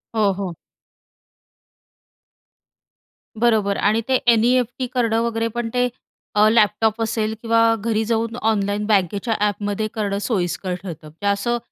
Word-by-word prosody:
हो, 210 Hz, -3 st, +3 dB
हो. 185 Hz, -2 st, -4 dB, 2.9 s
बरोबर. 215 Hz, -4 st, +2 dB
आणि 215 Hz, +3 st, +2 dB
ते 260 Hz, -, +2 dB
एन-ई-एफ-टी 245 Hz, +2 st, +2 dB
करणं 230 Hz, -2 st, +1 dB
वगैरे, 230 Hz, -1 st, -1 dB
पण 230 Hz, 0 st, -3 dB
ते 250 Hz, 0 st, +2 dB, 0.5 s
अ, 210 Hz, +1 st, +5 dB
लॅपटॉप 220 Hz, 0 st, +2 dB
असेल 220 Hz, -1 st, -1 dB
किंवा 230 Hz, 0 st, +2 dB
घरी 220 Hz, 0 st, -1 dB
जाऊन 230 Hz, 0 st, -1 dB
ऑनलाईन 205 Hz, 0 st, 0 dB
बँकेच्या 205 Hz, +2 st, +1 dB
ॲपमध्ये 205 Hz, +1 st, -2 dB
करणं 205 Hz, -3 st, -2 dB
सोयीस्कर 180 Hz, -4 st, -1 dB
ठरतं. 160 Hz, -4 st, -8 dB
म्हणजे 170 Hz, +7 st, -6 dB
असं 235 Hz, +4 st, +1 dB
220 Hz, 125 wpm, -21 LUFS, 200-230 Hz, 2.9 s, अ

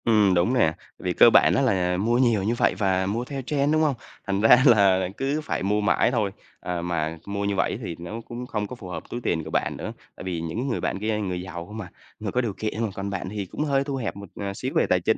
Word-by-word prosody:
Ừm, 105 Hz, -4 st, +4 dB
đúng 90 Hz, +8 st, +2 dB
nè, 95 Hz, -11 st, +3 dB, 0.3 s
vì -, -, -1 dB
cơ -, -, +8 dB
bản -, -, +6 dB
á -, -, +3 dB
là 90 Hz, -2 st, +2 dB
mua 115 Hz, +5 st, +2 dB
nhiều 120 Hz, -6 st, +3 dB
như 110 Hz, +4 st, +1 dB
vậy -, -, +2 dB
và 95 Hz, -2 st, +1 dB
mua 110 Hz, +5 st, -1 dB
theo 135 Hz, 0 st, -5 dB
trend, 140 Hz, +2 st, +1 dB
đúng 155 Hz, -, +3 dB
không? 150 Hz, -4 st, +2 dB, 0.3 s
Thành 100 Hz, 0 st, 0 dB
ra 110 Hz, +3 st, +8 dB
là 100 Hz, -7 st, +5 dB
cứ 140 Hz, +3 st, -1 dB
phải 150 Hz, -, -2 dB
mua 105 Hz, +2 st, +1 dB
mãi 105 Hz, +3 st, +3 dB
thôi. 110 Hz, -5 st, 0 dB, 0.3 s
À, 90 Hz, -1 st, -3 dB
mà 80 Hz, -2 st, -2 dB
mua 100 Hz, 0 st, -2 dB
như 100 Hz, 0 st, 0 dB
vậy 100 Hz, -, 0 dB
thì 85 Hz, -5 st, -4 dB
nó 95 Hz, +7 st, -6 dB
cũng 120 Hz, +1 st, -6 dB
không 105 Hz, -4 st, -2 dB
có 125 Hz, -, -7 dB
phù 105 Hz, -6 st, -10 dB
hợp 90 Hz, -, -7 dB
túi 120 Hz, -, -4 dB
tiền 80 Hz, -7 st, 0 dB
của 80 Hz, -, -7 dB
bạn -, -, -1 dB
nữa, -, -, -5 dB, 0.2 s
tại -, -, -9 dB
vì 90 Hz, -3 st, -3 dB
những 110 Hz, +11 st, -3 dB
người 120 Hz, -, -1 dB
bạn -, -, -1 dB
kia 110 Hz, +1 st, 0 dB
người 90 Hz, -4 st, -2 dB
giàu 85 Hz, -2 st, -7 dB
không 110 Hz, +4 st, -7 dB
à, 95 Hz, -, -9 dB, 0.3 s
người -, -, -3 dB
có 125 Hz, -, +1 dB
điều 115 Hz, -5 st, -2 dB
kiện, 110 Hz, +2 st, -3 dB, 0.2 s
còn 100 Hz, 0 st, -3 dB
bạn 95 Hz, -2 st, -4 dB
thì 105 Hz, -1 st, -4 dB
cũng 120 Hz, -, -4 dB
hơi 140 Hz, -2 st, +2 dB
thu 140 Hz, -1 st, -3 dB
hẹp 125 Hz, -5 st, -3 dB
một, 100 Hz, -2 st, -9 dB
ờ, 100 Hz, -1 st, -4 dB
xíu -, -, -4 dB
về -, -, +4 dB
tài -, -, +4 dB
chính, -, -, +2 dB
100 Hz, 275 wpm, -25 LUFS, 95-120 Hz, 0.3 s, cơ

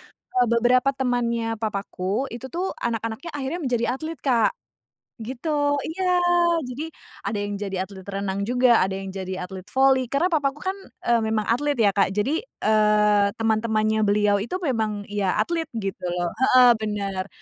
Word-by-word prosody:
eee, 250 Hz, -1 st, 0 dB
beberapa 245 Hz, +3 st, +3 dB
temannya 235 Hz, -3 st, -1 dB
papaku, 205 Hz, +2 st, -2 dB
itu 235 Hz, +3 st, -7 dB
tuh 360 Hz, +3 st, -2 dB
anak-anaknya 230 Hz, +7 st, -3 dB
akhirnya 290 Hz, +5 st, -3 dB
menjadi 240 Hz, -2 st, 0 dB
atlet, 320 Hz, -2 st, -6 dB
Kak. 240 Hz, -5 st, +2 dB, 0.7 s
gitu 285 Hz, +5 st, -1 dB
iya. 370 Hz, +4 st, -3 dB, 0.6 s
Jadi 255 Hz, +5 st, -5 dB, 0.4 s
ada 210 Hz, -, -1 dB
yang 205 Hz, 0 st, -3 dB
jadi 195 Hz, -2 st, -2 dB
atlet 190 Hz, -1 st, -11 dB
renang 195 Hz, 0 st, -2 dB
juga, 245 Hz, -1 st, +4 dB
ada 190 Hz, 0 st, -2 dB
yang 195 Hz, 0 st, -5 dB
jadi 190 Hz, -1 st, -5 dB
atlet 190 Hz, -1 st, -9 dB
voli, 265 Hz, -1 st, +3 dB
karena 285 Hz, +6 st, +2 dB
papaku 290 Hz, -2 st, 0 dB
kan, 380 Hz, -, 0 dB, 0.4 s
eee, 235 Hz, -1 st, +4 dB
memang 220 Hz, -1 st, 0 dB
atlet 290 Hz, +5 st, +1 dB
ya, 205 Hz, -3 st, +5 dB
Kak, 195 Hz, -1 st, +3 dB
jadi, 270 Hz, +11 st, +1 dB
eee, 210 Hz, -, +3 dB
teman-temannya 220 Hz, -1 st, +1 dB
beliau 205 Hz, 0 st, +3 dB
itu 360 Hz, -, -4 dB
memang 220 Hz, -7 st, -1 dB
ya 200 Hz, -3 st, 0 dB
atlet 330 Hz, -2 st, 0 dB
gitu 195 Hz, -5 st, -4 dB
loh, 175 Hz, 0 st, -1 dB
heeh, 255 Hz, 0 st, +6 dB
benar. 200 Hz, -3 st, -3 dB
225 Hz, 155 wpm, -24 LUFS, 205-265 Hz, 0.7 s, heeh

